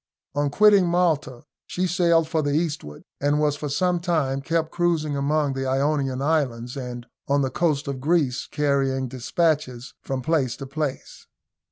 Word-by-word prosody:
On 145 Hz, 0 st, 0 dB
quitting 200 Hz, +3 st, +5 dB
Malta 160 Hz, -8 st, 0 dB, 0.2 s
she 185 Hz, -, -1 dB
sailed 170 Hz, -2 st, +2 dB
for 160 Hz, -1 st, 0 dB
the 145 Hz, -1 st, -1 dB
eastward, 150 Hz, -, -3 dB, 0.2 s
and 145 Hz, +1 st, +2 dB
was 150 Hz, -1 st, +2 dB
for 145 Hz, 0 st, -5 dB
some 175 Hz, +5 st, +1 dB
time 155 Hz, -6 st, 0 dB
kept 160 Hz, +2 st, -1 dB
cruising 165 Hz, -4 st, 0 dB
among 145 Hz, 0 st, +1 dB
the 135 Hz, 0 st, -3 dB
Ionian 135 Hz, -1 st, 0 dB
Islands, 130 Hz, -6 st, 0 dB
and 125 Hz, -3 st, -6 dB, 0.2 s
on 140 Hz, 0 st, +2 dB
the 130 Hz, -, -1 dB
coast 155 Hz, -4 st, 0 dB
of 135 Hz, -2 st, -4 dB
Greece, 145 Hz, -4 st, +1 dB
carrying 135 Hz, -2 st, 0 dB
despatches 130 Hz, -1 st, -1 dB
from 130 Hz, -1 st, -4 dB
place 135 Hz, -5 st, +1 dB
to 135 Hz, -, -7 dB
place. 140 Hz, 0 st, -5 dB
145 Hz, 160 wpm, -24 LUFS, 135-160 Hz, 0.2 s, quitting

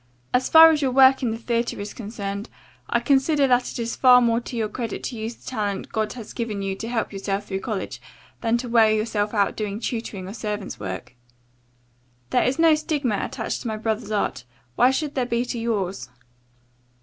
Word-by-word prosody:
As 250 Hz, +1 st, +2 dB
far 325 Hz, 0 st, +9 dB
as 305 Hz, -2 st, 0 dB
your 270 Hz, -, +2 dB
work 265 Hz, +1 st, +6 dB
in 250 Hz, -, 0 dB
the 225 Hz, -, -3 dB
theatre 235 Hz, 0 st, -2 dB
is 205 Hz, +1 st, -6 dB
concerned, 205 Hz, -1 st, -5 dB, 0.4 s
I -, -, +2 dB
consider 280 Hz, +1 st, +3 dB
that 250 Hz, -1 st, +2 dB
it -, -, -7 dB
is 235 Hz, -1 st, -3 dB
far 250 Hz, -1 st, +7 dB
more 235 Hz, -1 st, +2 dB
to 240 Hz, -, -8 dB
your 220 Hz, -2 st, 0 dB
credit 230 Hz, +1 st, -5 dB
to 250 Hz, -, -4 dB
use 225 Hz, +1 st, -5 dB
the -, -, -20 dB
talent 205 Hz, -5 st, -3 dB
God 220 Hz, -1 st, -1 dB
has 235 Hz, -4 st, -9 dB
given 215 Hz, -4 st, -3 dB
you 195 Hz, 0 st, -2 dB
to 225 Hz, -, -5 dB
help 230 Hz, -3 st, -2 dB
yourself 195 Hz, +1 st, -3 dB
through 190 Hz, -1 st, -3 dB
college, 210 Hz, -3 st, -4 dB, 0.4 s
than 230 Hz, 0 st, +2 dB
to 245 Hz, +1 st, -5 dB
wear 230 Hz, -2 st, +5 dB
yourself 215 Hz, -1 st, 0 dB
out 200 Hz, -2 st, +2 dB
doing 210 Hz, -1 st, -3 dB
tutoring 225 Hz, -5 st, -4 dB
or 195 Hz, -, -7 dB
servants' 210 Hz, -3 st, -5 dB
work. 95 Hz, +3 st, -6 dB, 1.2 s
There -, -, +3 dB
is 255 Hz, +2 st, 0 dB
no 325 Hz, -1 st, +6 dB
stigma 295 Hz, -, 0 dB
attached -, -, -4 dB
to -, -, -5 dB
my 220 Hz, -1 st, -2 dB
brother's 220 Hz, 0 st, -2 dB
art, 205 Hz, -11 st, -1 dB, 0.3 s
why 250 Hz, -, +5 dB
should 290 Hz, +2 st, -1 dB
there 255 Hz, -3 st, -1 dB
be 235 Hz, 0 st, 0 dB
to 240 Hz, -1 st, -4 dB
yours?" 200 Hz, -, -2 dB
230 Hz, 205 wpm, -23 LUFS, 205-250 Hz, 1.2 s, far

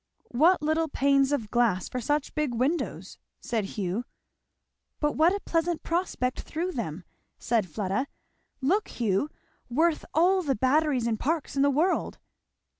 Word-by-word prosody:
"What 315 Hz, +6 st, +4 dB
little 315 Hz, +1 st, +1 dB
panes 275 Hz, -1 st, +2 dB
of 230 Hz, -8 st, -2 dB
glass 230 Hz, -7 st, +2 dB
for 250 Hz, -, -4 dB
such 295 Hz, +4 st, -1 dB
big 300 Hz, -6 st, -1 dB
windows!" 275 Hz, +8 st, -2 dB, 0.2 s
said 225 Hz, -4 st, -2 dB
Hugh. 195 Hz, +3 st, -1 dB, 1.0 s
"But 295 Hz, -1 st, +1 dB
what 320 Hz, +4 st, +4 dB
a 400 Hz, -, -1 dB
pleasant 335 Hz, 0 st, -1 dB
prospect 335 Hz, -7 st, -1 dB
through 345 Hz, +4 st, -3 dB
them," 190 Hz, -, -4 dB, 0.3 s
said 220 Hz, -6 st, 0 dB
Fleda, 200 Hz, -, -1 dB, 0.5 s
"look, 375 Hz, +11 st, +2 dB
Hugh! 225 Hz, +4 st, 0 dB, 0.4 s
worth 315 Hz, +6 st, +2 dB
all 370 Hz, +4 st, +4 dB
the 280 Hz, -6 st, 0 dB
Batteries 265 Hz, +1 st, +2 dB
and 225 Hz, -2 st, 0 dB
Parks 310 Hz, -1 st, -1 dB
in 275 Hz, -, +2 dB
the 285 Hz, -, +5 dB
world." 315 Hz, +7 st, +1 dB
280 Hz, 145 wpm, -27 LUFS, 235-320 Hz, 1.0 s, the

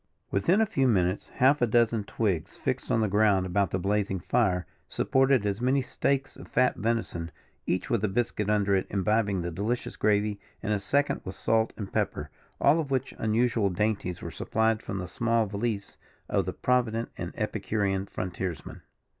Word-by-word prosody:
Within 175 Hz, -, +3 dB
a -, -, +4 dB
few 135 Hz, -9 st, +1 dB
minutes, 95 Hz, -4 st, +1 dB
half 140 Hz, +3 st, +4 dB
a 120 Hz, -, +4 dB
dozen 115 Hz, -2 st, +2 dB
twigs, 100 Hz, -9 st, -2 dB
fixed -, -, -2 dB
in 115 Hz, -, +2 dB
the 110 Hz, -, +2 dB
ground 100 Hz, -2 st, +3 dB
about 95 Hz, +1 st, +1 dB
the -, -, -1 dB
blazing 100 Hz, 0 st, 0 dB
fire, 90 Hz, -3 st, +1 dB, 0.2 s
supported 130 Hz, -3 st, +2 dB
as 100 Hz, +2 st, -1 dB
many 130 Hz, +2 st, +2 dB
steaks 135 Hz, +2 st, -1 dB
of -, -, -11 dB
fat 125 Hz, +1 st, +2 dB
venison, 110 Hz, -7 st, -2 dB, 0.4 s
each 90 Hz, -, 0 dB
with 115 Hz, -3 st, +1 dB
a -, -, +3 dB
biscuit 105 Hz, 0 st, -1 dB
under 100 Hz, -2 st, +2 dB
it 95 Hz, -, 0 dB
imbibing 100 Hz, -1 st, +1 dB
the 85 Hz, -, -3 dB
delicious 105 Hz, +8 st, -2 dB
gravy, 105 Hz, -1 st, +1 dB, 0.2 s
and 105 Hz, -1 st, 0 dB
a 105 Hz, -, 0 dB
second 140 Hz, +8 st, +1 dB
with 95 Hz, -, -6 dB
salt 110 Hz, 0 st, +1 dB
and 100 Hz, -3 st, -6 dB
pepper, -, -, -1 dB, 0.3 s
all 150 Hz, +4 st, +4 dB
of 150 Hz, -4 st, -2 dB
which 135 Hz, -1 st, -1 dB
unusual 110 Hz, -1 st, +2 dB
dainties 95 Hz, -1 st, -1 dB
were -, -, -5 dB
supplied 110 Hz, 0 st, 0 dB
from 95 Hz, -, -5 dB
the 90 Hz, -1 st, -4 dB
small 115 Hz, +4 st, +1 dB
valise 100 Hz, 0 st, -3 dB, 0.3 s
of -, -, +1 dB
the -, -, -2 dB
provident 120 Hz, -2 st, 0 dB
and -, -, -5 dB
epicurean 100 Hz, -2 st, -1 dB
frontiers 90 Hz, -3 st, -4 dB
man. -, -, -10 dB
105 Hz, 180 wpm, -28 LUFS, 95-120 Hz, 0.4 s, a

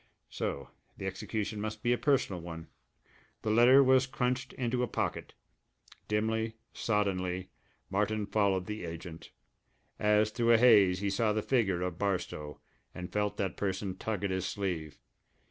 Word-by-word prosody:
So 70 Hz, -2 st, -3 dB, 0.3 s
the 95 Hz, -, -6 dB
execution 105 Hz, +2 st, -3 dB
must 110 Hz, 0 st, -5 dB
be 120 Hz, 0 st, +3 dB
a -, -, +1 dB
personal 120 Hz, -, +1 dB
one! 80 Hz, -1 st, -8 dB, 0.7 s
The 110 Hz, -, 0 dB
letter 125 Hz, +5 st, +7 dB
was 130 Hz, 0 st, +4 dB
crunched 125 Hz, -1 st, -1 dB
into 125 Hz, -1 st, -1 dB
a 125 Hz, -, +1 dB
pocket. -, -, -3 dB, 0.7 s
Dimly, 110 Hz, +1 st, 0 dB, 0.2 s
soddenly, 95 Hz, -4 st, -1 dB, 0.4 s
Martin 105 Hz, +1 st, 0 dB
followed 100 Hz, -3 st, +1 dB
the 105 Hz, 0 st, -5 dB
agent. 85 Hz, 0 st, -8 dB, 0.7 s
As 105 Hz, 0 st, +3 dB
through 115 Hz, +1 st, +3 dB
a -, -, +7 dB
haze 100 Hz, -6 st, +6 dB
he 100 Hz, -1 st, 0 dB
saw 105 Hz, +2 st, +1 dB
the 110 Hz, 0 st, -1 dB
figure 95 Hz, -9 st, +1 dB
of 90 Hz, -1 st, -4 dB
Barstow, 90 Hz, -7 st, -2 dB, 0.4 s
and 90 Hz, -1 st, -7 dB
felt 105 Hz, 0 st, 0 dB
that 95 Hz, -3 st, -2 dB
person 95 Hz, -1 st, -2 dB
tug 105 Hz, 0 st, -3 dB
at 100 Hz, -, 0 dB
his 95 Hz, 0 st, -1 dB
sleeve. 85 Hz, -7 st, -3 dB
105 Hz, 150 wpm, -31 LUFS, 95-110 Hz, 0.7 s, letter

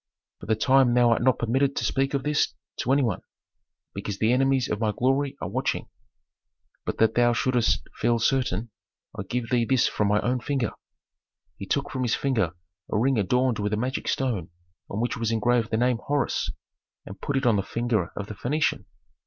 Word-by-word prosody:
"For -, -, -10 dB
the 110 Hz, -, +2 dB
time 130 Hz, +1 st, +4 dB
thou 120 Hz, -1 st, +5 dB
art 115 Hz, -, +2 dB
not 130 Hz, +1 st, +3 dB
permitted 135 Hz, +4 st, +1 dB
to -, -, -1 dB
speak 135 Hz, +1 st, 0 dB
of 135 Hz, -, -1 dB
this 150 Hz, +1 st, +1 dB, 0.2 s
to 130 Hz, -, -1 dB
any 140 Hz, +1 st, +4 dB
one, 110 Hz, -7 st, -1 dB, 0.7 s
because 100 Hz, 0 st, -4 dB
the 110 Hz, +3 st, +2 dB
enemies 135 Hz, 0 st, +2 dB
of 105 Hz, -, -2 dB
my 110 Hz, -2 st, +1 dB
glory 135 Hz, +5 st, 0 dB
are -, -, -4 dB
watching. -, -, -2 dB, 1.0 s
But -, -, -2 dB
that 110 Hz, 0 st, +3 dB
thou 120 Hz, 0 st, +4 dB
shouldst 125 Hz, -1 st, +1 dB
feel 120 Hz, 0 st, +2 dB
certain, 115 Hz, -3 st, 0 dB, 0.4 s
I -, -, -4 dB
give 115 Hz, +5 st, -4 dB
thee 120 Hz, -2 st, +3 dB
this 130 Hz, +1 st, +3 dB
from 105 Hz, -, 0 dB
my 105 Hz, +1 st, +3 dB
own 125 Hz, +1 st, 0 dB
finger." 130 Hz, -3 st, -1 dB, 0.8 s
He 100 Hz, -, -8 dB
took 140 Hz, 0 st, -1 dB
from 130 Hz, -, -3 dB
his 120 Hz, -2 st, +1 dB
finger 110 Hz, -11 st, 0 dB, 0.4 s
a -, -, +1 dB
ring 125 Hz, +2 st, +2 dB
adorned 125 Hz, +3 st, +1 dB
with 105 Hz, 0 st, -1 dB
a -, -, +1 dB
magic 130 Hz, +4 st, -2 dB
stone 115 Hz, -11 st, -1 dB, 0.4 s
on 100 Hz, -, -3 dB
which 120 Hz, -, -1 dB
was 115 Hz, -2 st, -1 dB
engraved 115 Hz, +1 st, +1 dB
the 110 Hz, -, 0 dB
name 125 Hz, 0 st, +2 dB
Horus, 145 Hz, -1 st, -1 dB, 0.6 s
and 95 Hz, -, -10 dB
put 140 Hz, -, -1 dB
it 135 Hz, -, -1 dB
on 115 Hz, -4 st, +4 dB
the -, -, +2 dB
finger 110 Hz, -3 st, -1 dB
of 105 Hz, -, -4 dB
the 105 Hz, -, -7 dB
Phœnician. 130 Hz, -2 st, -1 dB
120 Hz, 200 wpm, -26 LUFS, 110-130 Hz, 1.0 s, thou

